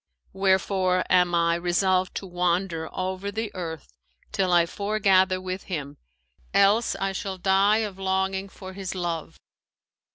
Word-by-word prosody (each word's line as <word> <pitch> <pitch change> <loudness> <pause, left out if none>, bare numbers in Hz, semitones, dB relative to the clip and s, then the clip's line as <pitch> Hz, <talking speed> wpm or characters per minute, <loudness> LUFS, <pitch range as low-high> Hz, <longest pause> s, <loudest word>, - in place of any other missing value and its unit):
Wherefore 190 -1 +2
am 180 -1 +4
I 170 0 +3
resolved 185 +2 +1
to - - -4
wander 175 -2 -1
over 185 +2 -3
the 220 +1 -4
earth, 160 - -6 0.4
till 185 -2 0
I 175 -1 +5
foregather 190 -1 +2
with 185 +1 -5
him; 145 -5 -5 0.6
else 205 +4 +4
I 195 0 -1
shall 195 0 -4
die 200 +4 +3
of 195 -2 -8
longing 190 0 -1
for 190 -1 -10
his 190 -1 -5
love.' 170 -3 -4
185 Hz, 135 wpm, -25 LUFS, 175-195 Hz, 0.6 s, I